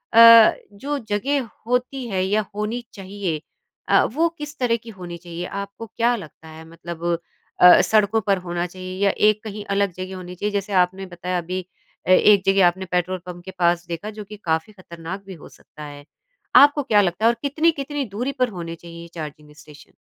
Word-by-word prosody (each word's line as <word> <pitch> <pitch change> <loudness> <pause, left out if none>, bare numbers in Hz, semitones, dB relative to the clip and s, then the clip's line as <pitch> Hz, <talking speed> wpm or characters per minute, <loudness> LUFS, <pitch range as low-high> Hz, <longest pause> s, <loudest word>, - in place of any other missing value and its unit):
अ, 230 -1 +9 0.2
जो 285 +8 -4
जगह 255 +5 0 0.2
होती 250 +1 -1
है 190 -4 -1
या 210 +2 0
होनी 220 +3 -3
चाहिए 195 -5 -4 0.5
अ, - - +5
वो 320 +8 +1
किस 295 +1 -8
तरह 245 -2 +2
की 235 - -11
होनी 175 -2 -7
चाहिए 175 0 -7 0.2
आपको 200 +3 -8
क्या 235 +2 +1
लगता 160 -5 -11
है 160 0 -11
मतलब 165 0 -9 0.6
अ, 180 0 +9
सड़कों 215 0 +2
पर 195 -1 +3
होना 175 0 -2
चाहिए 185 +1 -8
या 200 - +4 0.2
एक 215 +1 -1
कहीं 210 -1 -7
अलग 200 -1 +1
जगह 185 +1 -7
होनी 180 -1 -8
चाहिए 210 +4 -2
जैसे 200 0 -2
आपने 190 +2 -6
बताया 180 0 -4
अभी 180 +2 -3 0.5
अ, 185 - +3
एक 200 +1 +6
जगह 195 -2 +5
आपने 190 +2 -2
पेट्रोल 180 +1 0
पंप 175 -1 -9
के 190 - -7
पास 175 0 +2
देखा 170 +5 -5
जो 210 - -5
कि 210 +1 -11
काफ़ी 160 +5 -1
खतरनाक 180 0 -9
भी 195 - -9
हो - - -11
सकता 150 - -14
है 145 -1 -10 0.5
आपको 290 0 +7
क्या 210 -5 +4
लगता 190 +3 -1
है 230 - +7
और 235 - +1
कितनी-कितनी 290 -1 0
दूरी 245 +8 -3
पर 255 -1 +2
होने 170 -4 -6
चाहिए 170 0 -11
ये 170 - -10
चार्जिंग 150 -2 -9
स्टेशन? 150 -1 -16
195 Hz, 195 wpm, -22 LUFS, 175-225 Hz, 0.6 s, अ